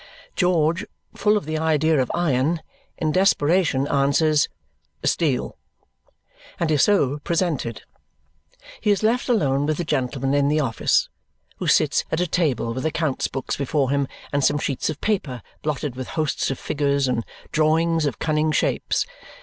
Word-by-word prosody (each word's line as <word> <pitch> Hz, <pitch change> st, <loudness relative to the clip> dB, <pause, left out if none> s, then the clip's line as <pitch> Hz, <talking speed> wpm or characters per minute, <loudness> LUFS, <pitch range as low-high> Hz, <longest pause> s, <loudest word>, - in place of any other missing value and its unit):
George, 170 Hz, 0 st, +2 dB, 0.3 s
full 210 Hz, 0 st, +3 dB
of 205 Hz, -, -4 dB
the 155 Hz, 0 st, -2 dB
idea 160 Hz, -2 st, +2 dB
of 125 Hz, -, -2 dB
iron, 160 Hz, -1 st, +1 dB, 0.3 s
in 155 Hz, -1 st, 0 dB
desperation 170 Hz, -5 st, +2 dB
answers 145 Hz, +2 st, +2 dB, 0.5 s
"Steel," 145 Hz, -7 st, 0 dB, 1.0 s
and 165 Hz, -2 st, 0 dB
is 150 Hz, -3 st, +3 dB
so 150 Hz, -9 st, +3 dB
presented. 155 Hz, -, -2 dB, 1.0 s
He 215 Hz, -, 0 dB
is 205 Hz, +1 st, +2 dB
left 240 Hz, +4 st, +1 dB
alone 145 Hz, -, +2 dB
with 155 Hz, -1 st, 0 dB
the -, -, -1 dB
gentleman 135 Hz, -3 st, -1 dB
in 140 Hz, 0 st, +3 dB
the 150 Hz, +2 st, +2 dB
office, 130 Hz, -7 st, +1 dB, 0.5 s
who -, -, -4 dB
sits -, -, +3 dB
at 160 Hz, -, 0 dB
a 180 Hz, -, +2 dB
table 150 Hz, -9 st, 0 dB
with 130 Hz, -, -4 dB
account 155 Hz, -3 st, -1 dB
books 135 Hz, -1 st, -3 dB
before 140 Hz, -1 st, 0 dB
him 140 Hz, -1 st, +1 dB, 0.3 s
and 140 Hz, -1 st, +1 dB
some 140 Hz, -, +3 dB
sheets 140 Hz, 0 st, -2 dB
of 155 Hz, -, -4 dB
paper 150 Hz, -, -1 dB, 0.2 s
blotted 145 Hz, -3 st, -3 dB
with 130 Hz, 0 st, -6 dB
hosts 155 Hz, -2 st, 0 dB
of 135 Hz, -, -2 dB
figures 140 Hz, -2 st, 0 dB
and 115 Hz, -2 st, 0 dB, 0.3 s
drawings 160 Hz, 0 st, +2 dB
of 135 Hz, -, -3 dB
cunning 155 Hz, 0 st, +1 dB
shapes. -, -, 0 dB
150 Hz, 155 wpm, -23 LUFS, 135-165 Hz, 1.0 s, full